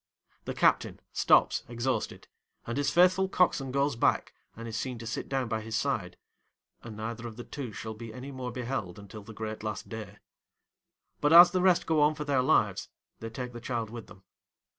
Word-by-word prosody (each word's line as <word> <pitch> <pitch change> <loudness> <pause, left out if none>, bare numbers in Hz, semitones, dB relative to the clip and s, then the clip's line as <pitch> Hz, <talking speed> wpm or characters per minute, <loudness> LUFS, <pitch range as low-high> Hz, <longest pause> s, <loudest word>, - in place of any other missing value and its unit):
The - - -4
captain - - +2
stops - - +4
exhausted, 120 +2 -3 0.4
and 120 - -4
his 145 -1 +1
faithful 185 +4 +4
coxswain 145 -8 +2
goes 140 0 +1
back 115 - +1 0.2
and 115 +1 -8
is 110 - -5
seen 125 +1 -3
to 115 - -8
sit 110 - -4
down 135 -2 -1
by 110 -1 -2
his 110 0 -5
side, 105 - -1 0.6
and 110 -2 -9
neither 115 +2 -5
of 110 - -9
the 120 - -7
two 135 -4 -6
shall 110 +2 -6
be 115 +1 -9
any 130 +4 -8
more 130 -2 -5
beheld 120 -7 -4
until 100 +1 -10
the 105 +3 -11
great 110 0 -6
last 105 0 -5
day; 105 -3 -7 1.0
but, 145 - +2
as 175 +1 +10
the 185 - +1
rest 180 -2 +4
go 160 -2 +2
on 150 +1 +4
for 150 - -4
their 140 -3 +2
lives, 125 - +2 0.3
they 115 - -6
take 125 +2 -6
the 120 - -8
child 115 -3 -3
with 115 -2 -8
them. 95 -2 -16
120 Hz, 200 wpm, -29 LUFS, 110-140 Hz, 1.0 s, as